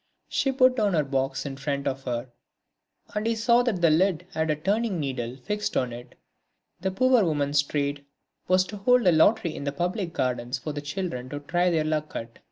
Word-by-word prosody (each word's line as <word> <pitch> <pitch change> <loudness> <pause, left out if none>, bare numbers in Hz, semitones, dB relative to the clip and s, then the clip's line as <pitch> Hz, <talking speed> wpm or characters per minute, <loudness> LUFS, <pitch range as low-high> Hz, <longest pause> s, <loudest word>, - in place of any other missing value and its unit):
She 270 - +1
put 255 -1 +4
down 210 -6 +1
her 155 - +3
box 135 0 -2
in 135 -1 -5
front 140 0 -2
of 135 0 -3
her, 120 0 -2 0.9
and 210 +1 -1
he 230 - +1
saw 235 +2 +4
that 235 -8 -1
the 165 -2 +5
lid 180 +1 +2
had 160 -3 -1
a 155 - +2
turning 200 +4 0
needle 130 -4 -3
fixed 210 +11 -3
on 125 -2 0
it; 120 +1 -10 0.6
the 190 +2 -1
poor 250 +4 +3
woman's 145 -3 +2
trade 140 0 -2 0.4
was 185 0 +4
to 205 +3 -8
hold 250 +3 +3
a 180 - +6
lottery 170 +1 +3
in - - -6
the 140 - -1
public 175 +4 -2
gardens 125 -3 -1
for 150 +3 -5
the 145 - -4
children 145 -4 -4
to 145 - -5
try 175 +5 +1
their 160 -3 +1
luck 155 0 -2
at. 115 0 -6
155 Hz, 205 wpm, -26 LUFS, 140-195 Hz, 0.9 s, a